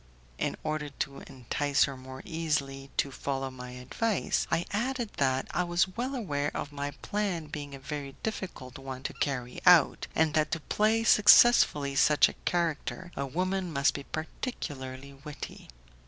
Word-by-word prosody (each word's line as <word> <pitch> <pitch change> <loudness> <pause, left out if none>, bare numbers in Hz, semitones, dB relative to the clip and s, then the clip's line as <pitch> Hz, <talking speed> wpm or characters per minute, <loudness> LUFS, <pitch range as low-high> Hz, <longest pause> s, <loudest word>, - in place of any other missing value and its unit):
In - - -1
order 155 -1 -2
to 140 0 -4
entice 140 +3 0
her 140 - -1
more 130 +1 -10
easily 145 -5 -2
to 140 - +1
follow 135 0 -3
my 125 -1 -9
advice, 175 - -1
I 170 - +1
added 240 +2 -1
that 130 -1 +1
I 180 - +1
was 175 +2 +1
well 255 +4 -2
aware 145 - -1
of 145 - -4
my 145 0 -3
plan 200 -6 -1
being 145 -2 -7
a - - -10
very 140 0 -6
difficult 175 - -5
one 135 -1 -7
to - - -3
carry 125 -3 -3
out, 175 -5 +6
and 160 -1 +3
that 155 -1 +2
to 165 - -1
play 215 +7 +1
successfully 210 -10 +6
such 150 +1 +6
a - - -6
character 175 +1 -1
a 140 - -2
woman 185 +4 -1
must 140 -2 +2
be 140 - -5
particularly 140 - -5
witty. 150 -2 -8
150 Hz, 160 wpm, -29 LUFS, 135-180 Hz, -, out